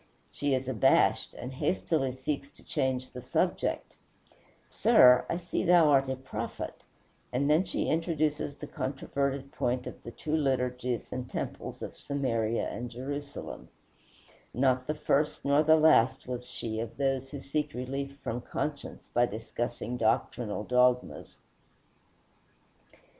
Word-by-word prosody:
She 145 -2 0
is 130 0 -3
abashed, 125 -6 +3
and 125 +2 -6
hastily 135 -1 0
seeks 140 +2 -3
to - - -20
change 130 -3 -1
the 125 - -7
subject: - - -1 0.7
"Sir, 125 0 +6
I - - 0
see 175 -1 -2
thou 170 -3 +6
art 135 -1 +4
a 130 - 0
prophet;" 130 +1 -5 0.6
and 135 +3 +1
then 155 +5 +4
she - - -2
introduces 155 -3 0
the 150 - -8
controverted 140 0 -2
point 125 +1 -1
of - - -8
the - - -8
two 150 +6 -3
liturgies 125 -4 0
and 125 -1 -4
temples - - -5
of - - -6
Samaria 115 -5 -1
and 120 +1 -5
Jerusalem, 140 +4 -6 0.9
not 130 0 +2
the 150 - -1
first 150 0 0
nor 140 +1 +5
the 155 +1 +6
last 155 -8 +4
was 125 -1 -4
she 110 -2 -4
of 115 0 -5
those 135 -1 0
who 140 - -6
seek 150 +2 -2
relief 135 +2 -4
from 120 +2 -3
conscience 145 +3 -4
by 120 0 +4
discussing 120 +2 -4
doctrinal 110 -1 0
dogmas. 125 +2 +1
130 Hz, 135 wpm, -30 LUFS, 125-145 Hz, 0.9 s, Sir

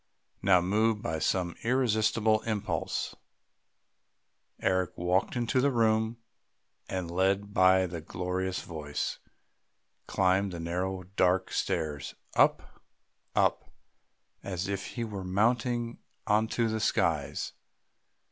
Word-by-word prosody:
Now, 90 -2 +5
moved 105 +4 +1
by 80 - -2
some 90 +1 0
irresistible 110 -3 +2
impulse, 110 -3 -2 1.5
Eric 95 -2 0
walked 90 +5 +1
into 120 +1 +1
the 140 - +4
house, 110 -1 +2 0.7
and, 90 -3 -3
led 100 +3 +1
by 95 0 +5
the 85 -2 -5
glorious 90 +3 -3
voice, 75 -3 -4 0.9
climbed 95 0 +2
the 85 - -5
narrow 90 +3 -2
dark 90 0 +1
stairs, 75 -4 -2 0.2
up, - - +2 0.5
up, - - +2 0.7
as 95 -1 -3
if 100 -1 -3
he 120 - -4
were 105 -4 -5
mounting 115 +5 0 0.3
into 110 +2 +2
the 110 0 -1
skies. 110 - 0
95 Hz, 105 wpm, -29 LUFS, 90-110 Hz, 1.5 s, Now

